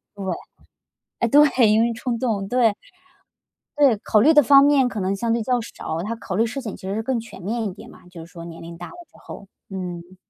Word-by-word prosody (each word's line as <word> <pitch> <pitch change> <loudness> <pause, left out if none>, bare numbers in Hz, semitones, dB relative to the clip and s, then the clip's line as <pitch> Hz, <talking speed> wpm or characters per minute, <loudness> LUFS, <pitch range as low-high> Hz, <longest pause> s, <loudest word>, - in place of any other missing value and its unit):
对， 200 - -7 1.0
哎 235 - +2
对， 265 -5 +5
因 215 - +4
为 235 - +1
冲 235 +1 -3
动， 215 -6 -1
对。 235 -3 +2 1.0
对， 275 -7 +4
考 210 +1 +2
虑 310 +6 +5
的 295 - +7
方 275 +1 +6
面 280 -3 +4
可 215 -5 -4
能 190 +1 0
相 230 +3 -1
对 230 -1 -1
较 250 0 +1
少， 165 -7 -6
他 225 +5 -4
考 190 -4 -6
虑 225 - +3
事 270 +5 -5
情 220 -5 -7
其 190 - -9
实 195 - -2
是 220 - -2
更 255 0 -1
全 225 -4 -11
面 220 +5 -3
一 190 - -4
点 - - -13
嘛， - - -17
就 170 -2 -11
是 170 - -19
说 170 -2 -10
年 165 -1 -10
龄 170 0 -10
大 175 - -8
了 - - -13 0.2
之 - - -21
后， 200 - -11 0.2
嗯。 180 -1 -7
220 Hz, 255 characters per minute, -22 LUFS, 190-245 Hz, 1.0 s, 的